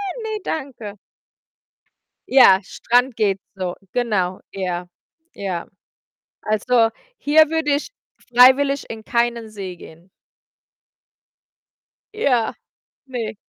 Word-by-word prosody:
„Ne, 430 +2 -4
danke.” 245 - -5 1.3
Ja, 195 -8 +7
Strand 245 +5 0
geht 200 -3 +1 0.2
so, 185 -2 -4 0.2
genau, 200 -7 -1
ja, 180 -2 -4 0.5
ja. 185 -4 -4 0.8
Also, 225 +2 +2 0.3
hier 310 +1 +4
würde 320 -2 0
ich 295 - -6 0.4
freiwillig 275 +3 +5
in 220 -1 -7
keinen 235 -2 -1
See 190 -4 -7
gehen. 170 +3 -15 2.1
Ja. 250 - +1 0.5
Ne. 230 -4 -4
230 Hz, 90 wpm, -21 LUFS, 195-270 Hz, 2.1 s, Ja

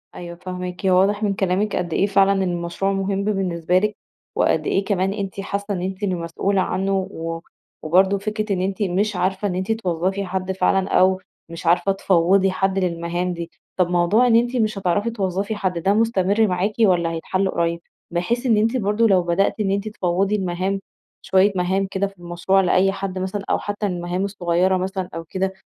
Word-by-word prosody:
أيوه 170 -1 -7
فاهماكِ، 180 +1 -6
هو 185 -1 +5
واضح 205 +2 +2
من 205 -2 +1
كلامِك 195 +2 0
قد 175 -2 -2
إيه 195 - +2
فعلًا 195 -1 +3
المشروع 175 +2 -1
مهم 195 0 -1
بالنسبة 180 -4 0
لكِ، 210 +1 -1 0.4
وقد - - +1
إيه 195 - +1
كمان 195 -1 0
أنتِ 200 -1 -5
حاسّة 200 +1 -3
إن 180 - -3
أنتِ 190 +2 -4
اللي 190 -3 0
مسؤولة 175 +3 -1
عنه، 195 +1 -1 0.2
و 165 -1 -5 0.4
وبرضه 190 +5 +3
فكرة 215 +1 -2
إن 180 - -2
أنتِ 190 +2 -2
مش 200 +2 0
عارفة 190 +3 0
إن 180 - -2
أنتِ 185 +4 -2
توظّفي 190 -2 -1
حد 185 0 -3
فعلًا 190 0 +1
أو 185 0 +3 0.3
مش 165 0 -8
عارفة 175 +4 +3
تفوّضي 190 0 +3
حد 190 +1 0
للمهام 175 0 -1
دي، 170 -1 -6 0.3
طب 180 -1 +3
موضوع 180 +8 +3
إن 230 - +4
أنتِ 240 +2 +2
مش 215 -4 0
هتعرفي 195 +3 0
توظّفي 200 0 -2
حد، 185 -4 -2
ده 190 +4 +2
مستمر 215 -1 +2
معاكِ 185 +3 0
والّا 175 -6 +3
هيتحل 185 +4 -1
قريّب؟ 170 -1 -1 0.3
بحيث 205 +9 -1
إن 230 -4 +4
أنتِ 225 +4 +2
برضه 210 +1 +2
لو 190 -4 +4
بدأتِ 175 +5 +1
إن 200 -2 +1
أنتِ 200 +2 -1
تفوّضي 195 0 0
المهام، 190 0 -1 0.4
شوية 190 +2 +3
مهام 190 +2 0
كده 195 +1 0
في 195 0 -16
المشروع 175 +3 +1
لأي 190 +1 +3
حد 195 -1 -4
مثلًا 190 +2 -3
أو - - +2
حتّى 205 +1 -3
المهام 180 0 -2
الصغيرة 185 -1 +1
مثلًا 185 0 -3
أو 165 - -4
كده، 190 +3 -2
190 Hz, 190 wpm, -21 LUFS, 180-200 Hz, 0.4 s, هو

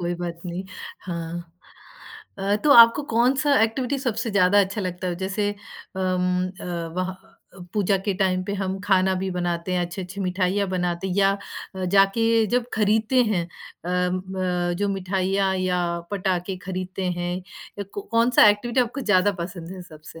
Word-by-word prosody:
कोई 175 0 -1
बात 170 -1 -5
नहीं, 175 +2 -4 0.4
हाँ। 170 -1 -6 0.9
अ, 200 +1 +1
तो 295 - +4
आपको 230 +3 +8
कौन-सा 265 +5 +3
एक्टिविटी 250 +4 0
सबसे 230 -3 -2
ज़्यादा 200 0 +4
अच्छा 200 +2 -1
लगता 185 -1 -4
है? 175 - -3
जैसे, 195 +2 -1 0.5
अम, 180 -1 0
अ, - - -7 0.3
वहा 185 0 -1 0.4
अ, - - -14 0.2
पूजा 200 -1 +2
के 200 - +1
टाइम 185 -1 +2
पे 200 - -3
हम 190 0 -2
खाना 190 -1 +3
भी 190 - -2
बनाते 175 0 -2
हैं, 180 - +1
अच्छी-अच्छी 185 +2 -7
मिठाइयाँ 185 +1 0
बनाते 180 0 -2
या 195 0 +5 0.4
अ, 185 - -3
जाके 195 +3 +4 0.3
जब 245 -1 +1
खरीदते 220 +4 +3
हैं, 190 -6 0 0.4
अम, 180 +1 0
ब 180 -2 -1
जो 205 0 0
मिठाइयाँ 195 0 0
या 185 -1 0 0.3
पटाखे 185 -1 -1
खरीदते 185 0 -4 0.2
हैं 175 0 -2 0.4
या 200 - -3
क 405 - -6
कौन-सा 230 -1 +6
एक्टिविटी 235 +5 +2
आपको 245 +3 -1
ज़्यादा 205 -4 +3
पसंद 175 -1 -7
है 185 - -8
सबसे? 155 -1 -13
190 Hz, 160 wpm, -24 LUFS, 180-205 Hz, 0.9 s, आपको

